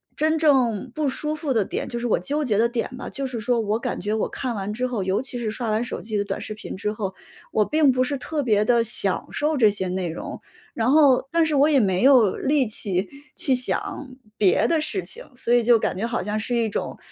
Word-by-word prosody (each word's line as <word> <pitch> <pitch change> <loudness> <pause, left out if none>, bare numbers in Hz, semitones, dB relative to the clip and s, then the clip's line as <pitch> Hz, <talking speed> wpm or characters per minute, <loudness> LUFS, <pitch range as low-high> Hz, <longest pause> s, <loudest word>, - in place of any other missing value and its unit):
真 315 +1 +2
正 260 -7 +2
不 305 -2 0
舒 300 +3 -2
服 300 -4 -2
的 220 - +2
点， - - -4
就 240 - -4
是 240 - -2
我 225 - +2
纠 290 - -2
结 215 -6 0
的 230 +2 +4
点 235 0 -3
吧， 250 - -7
就 275 -1 -4
是 245 -3 -5
说 235 +1 +1
我 215 0 0
感 - - -4
觉 210 +3 -1
我 220 - 0
看 250 -3 -4
完 200 0 -3
之 250 +3 -1
后 230 -6 -2
尤 190 +5 0
其 255 -1 -6
是 225 -3 -2
刷 230 +1 -3
完 215 +2 +1
手 240 - -5
机 215 -1 -3
的 200 - +1
短 200 -1 -4
视 215 - -6
频 210 - -8
之 210 +2 -2
后， 205 -3 -4 0.4
我 215 - +3
并 305 -3 +3
不 255 0 +1
是 280 +2 -2
特 295 +3 -3
别 215 -5 +2
地 235 -1 +3
享 200 -4 0
受 305 +1 0
这 225 -5 +5
些 200 -2 -2
内 180 -2 -2
容， 160 - -7 0.3
然 230 +3 +1
后 275 -3 +5
但 335 -1 +3
是 315 - -1
我 285 +2 +4
也 290 -3 +4
没 190 -5 +1
有 250 -7 +5
力 280 -2 +1
气 195 -3 -2 0.3
去 270 - 0
想 290 - -2 0.3
别 190 -4 +3
的 325 -2 +1
事 200 -11 -3
情。 175 - -7
所 240 -1 -1
以 245 - +5
就 235 0 +5
感 - - -1
觉 190 - -4
好 235 - -2
像 210 +1 -2
是 240 +3 -2
一 230 -1 +1
种， 210 - -4
235 Hz, 275 characters per minute, -23 LUFS, 210-270 Hz, 0.4 s, 这